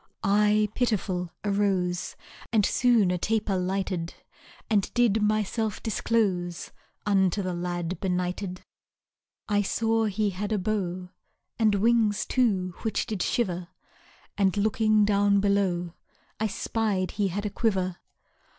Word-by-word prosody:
I 210 +1 +3
pitiful 190 -7 -1 0.2
arose, 195 -3 0 0.4
And 215 -3 +3
soon 235 -7 +3
a 180 - -1
taper 215 0 0
lighted; 185 -2 -2 0.5
And 205 -3 +1
did 230 -3 +3
myself 215 +1 0
disclose 190 -6 -1 0.3
Unto 195 -1 +2
the 185 -1 -2
lad 175 0 -3
benighted. 180 0 -2 0.8
I 205 -1 +2
saw 225 +2 +1
he 210 0 0
had 200 +3 -4
a 215 - +2
bow 185 -3 -2 0.5
And 215 -2 +4
wings, 215 -1 +2
too, 195 -8 +1
which 220 - -1
did 210 -4 -3
shiver; 180 -8 -1 0.7
And, 195 -1 +2
looking 215 0 +3
down 200 0 +3
below, 190 -4 +1 0.5
I 220 - +1
spied 205 -2 -1
he 205 -1 0
had 200 +3 -3
a 205 - -2
quiver. 190 -5 0
200 Hz, 125 wpm, -27 LUFS, 185-215 Hz, 0.8 s, And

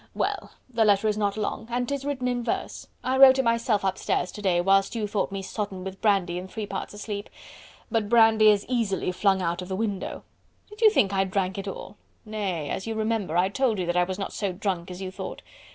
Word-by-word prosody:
Well! - - -2
the 235 -3 +1
letter 205 0 +3
is 210 - +1
not 205 -1 -1
long 215 +1 -3
and 245 +1 -1
'tis 280 0 -3
written 265 -3 -2
in 245 -1 -1
verse.... 230 - -3 0.2
I 260 +1 0
wrote 265 0 +9
it 265 - +2
myself 230 -3 +1
upstairs 185 -1 -1
to 210 - -9
day 185 -4 +2
whilst 195 +4 +3
you 220 -2 -1
thought 205 -1 -1
me 195 -1 -4
sodden 195 -2 -4
with 190 0 -7
brandy 190 -5 +2
and 185 +1 -8
three 215 +2 -4
parts 195 +1 -5
asleep. 205 0 -5 0.6
But 220 -3 0
brandy 225 -2 +6
is 205 -1 +3
easily 225 -7 0
flung 190 0 +2
out 170 +1 -1
of 180 - -7
the 190 - -3
window.... 205 -2 -3 0.5
Did 420 +2 -13
you 440 - +8
think 200 - +2
I 195 0 +3
drank 190 0 -1
it 195 - -6
all?... 195 +1 -7 0.3
Nay! 195 -8 -3
as 190 - -4
you 225 - -2
remember, 220 -6 -1
I 185 +2 +3
told 235 0 +1
you 185 - -1
that 175 0 -1
I 180 - +4
was 185 +1 -4
not 195 - -4
so 200 -3 -2
drunk 180 -2 -3
as 180 +1 -7
you 185 - -5
thought?... - - -7
205 Hz, 230 wpm, -26 LUFS, 190-225 Hz, 0.6 s, wrote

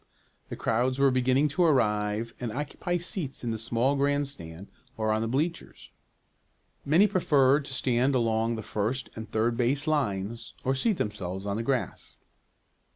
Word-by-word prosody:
The - - -5
crowds 125 +3 0
were 140 -1 +4
beginning 130 +3 +2
to 160 +6 +1
arrive 110 -6 +1
and 120 -3 -3
occupy 150 +7 -3
seats 170 -6 -1
in 120 - -1
the 110 - -3
small 120 +5 +1
grandstand 140 - -2 0.3
or 110 -1 0
on 110 - 0
the 115 - -1
bleachers. 155 +8 -3 0.9
Many 165 +8 +5
preferred 145 -7 +3
to 135 - -7
stand 130 +2 +1
along 115 -1 +1
the 110 - -6
first 110 +7 -2
and 110 0 -7
third 115 +2 +1
base 135 +4 +1
lines, 115 -7 -2
or 130 - +1
seat 195 - +1
themselves 95 - -4
on 100 -1 -2
the 110 - -2
grass. 130 +1 -3
125 Hz, 155 wpm, -28 LUFS, 110-140 Hz, 0.9 s, Many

